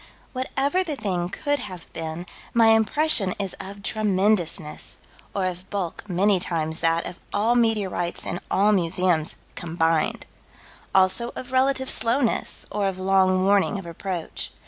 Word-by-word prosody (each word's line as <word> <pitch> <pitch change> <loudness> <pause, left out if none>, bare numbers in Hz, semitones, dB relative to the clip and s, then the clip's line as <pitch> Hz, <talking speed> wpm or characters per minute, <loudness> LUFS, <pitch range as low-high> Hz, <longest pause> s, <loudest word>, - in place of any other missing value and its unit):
Whatever 275 +7 0
the 315 -5 -3
thing 185 -7 -2
could 290 +8 -1
have 180 -3 -8
been, 160 +2 -5 0.3
my 230 -1 +6
impression 225 -2 +3
is 195 -2 -2
of 200 +1 -8
tremendousness, 195 -6 0 0.4
or 195 -2 0
of 180 0 -5
bulk 200 0 -4
many 190 +2 +3
times 160 -2 -1
that 165 0 +1
of 175 - -7
all 215 +4 +2
meteorites 210 -7 0
in 175 - -3
all 205 +2 +3
museums 175 -3 +2 0.2
combined: 165 -2 0 0.7
also 190 +5 +3
of 255 0 -7
relative 265 0 +2
slowness, 235 0 0
or 205 -1 0
of 190 -1 -3
long 185 0 +3
warning 200 +1 +3
of 190 - -7
approach. 170 0 -4
195 Hz, 140 wpm, -24 LUFS, 175-225 Hz, 0.7 s, my